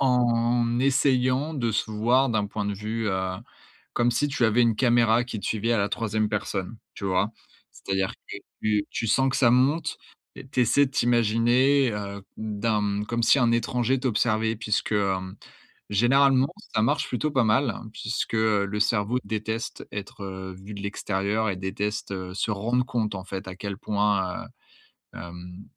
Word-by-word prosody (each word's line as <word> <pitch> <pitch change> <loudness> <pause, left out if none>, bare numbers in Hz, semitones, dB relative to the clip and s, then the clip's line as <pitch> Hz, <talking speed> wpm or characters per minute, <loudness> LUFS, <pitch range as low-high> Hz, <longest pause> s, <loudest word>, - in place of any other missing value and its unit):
en 120 -2 +2
essayant 130 +2 +2
de 120 -5 0
se 105 +1 -1
voir 120 +5 +3
d'un 110 -3 0
point 105 0 -4
de 105 - -1
vue, 110 +3 -3
heu, 95 -1 -1 0.6
comme 120 0 +2
si 145 +5 +1
tu 130 -3 +1
avais 110 +2 +3
une 115 -2 +3
caméra 120 -1 +4
qui 120 -2 -5
te - - -7
suivait 115 +2 0
à - - +2
la 100 0 +1
3e 110 -1 -1
personne, 105 0 -3 0.2
tu - - -10
vois? 95 +2 +1 0.4
C'est-à-dire 95 -1 -2 0.2
que - - -5 0.2
tu 105 -1 +1
tu - - -3
sens 130 +5 +3
que 130 - -1
ça 125 -3 +4
monte 145 +6 +2 0.4
et - - -10
tu 130 - 0
essaies 140 +4 +4
de 135 - -7
t'imaginer, 120 +2 +3
heu, 100 -1 -5 0.2
d'un 105 -1 -1
comme 115 +2 -2
si 130 - +5
un 120 -2 +3
étranger 120 +2 +1
t'observait 110 -2 +1
puisque, 110 0 -1
hem, 95 -2 -1 0.5
généralement 130 +5 +4 0.3
ça 110 - +2
marche 115 - +1
plutôt 150 +5 -1
pas 130 -3 +3
mal, 115 +4 +2 0.2
puisque, 110 +1 -3
heu, 110 -2 +2
le 105 +1 -3
cerveau 105 +2 +1
déteste 110 +1 -4
être, 100 0 -7
heu, 95 -1 -6
vu 100 +2 -9
de 100 - -7
l'extérieur 100 +2 -1
et 95 - -2
déteste, 100 +3 -3
heu, 95 -1 -5
se 100 - -2
rendre 120 +5 0
compte 115 -5 -1
en 95 -1 -6
fait 95 0 -6
à 95 - -7
quel 100 0 -5
point, 100 -4 0
heu, - - -12 0.7
hem, 90 +2 -9
110 Hz, 175 wpm, -26 LUFS, 100-120 Hz, 0.7 s, si